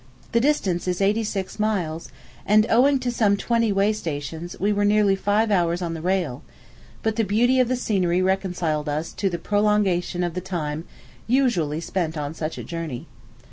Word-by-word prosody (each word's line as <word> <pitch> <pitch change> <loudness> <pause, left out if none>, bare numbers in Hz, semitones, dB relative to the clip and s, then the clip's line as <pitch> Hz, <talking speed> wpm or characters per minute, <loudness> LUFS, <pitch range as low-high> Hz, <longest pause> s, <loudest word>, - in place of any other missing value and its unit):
The 235 - +3
distance 210 -11 +1
is 180 -1 -1
eighty 205 +3 +2
six 200 -1 -4
miles; 180 -7 -1 0.3
and, 215 +1 +4
owing 270 +5 +5
to 250 -1 -1
some 210 -4 +2
twenty 230 0 +1
way 200 +2 +2
stations, 160 -2 -5
we 205 +2 +1
were 205 0 +1
nearly 205 -1 +4
five 210 +3 +1
hours 175 -3 +2
on 170 -2 -3
the 165 - -6
rail; 175 -7 -1 0.6
but 220 0 0
the 225 - +3
beauty 240 +6 +2
of 250 - +4
the 255 - 0
scenery 185 -7 +1
reconciled 175 -5 -1
us 155 +3 -3
to 200 - -1
a 175 -2 -1
prolongation 200 -2 +1
of 175 -1 -2
the 180 - -3
time 165 -4 -4 0.4
usually 200 - +1
spent 165 -2 -2
on 145 0 -3
such 160 0 -4
a - - -6
journey. 165 -7 -5
190 Hz, 180 wpm, -23 LUFS, 165-215 Hz, 0.6 s, owing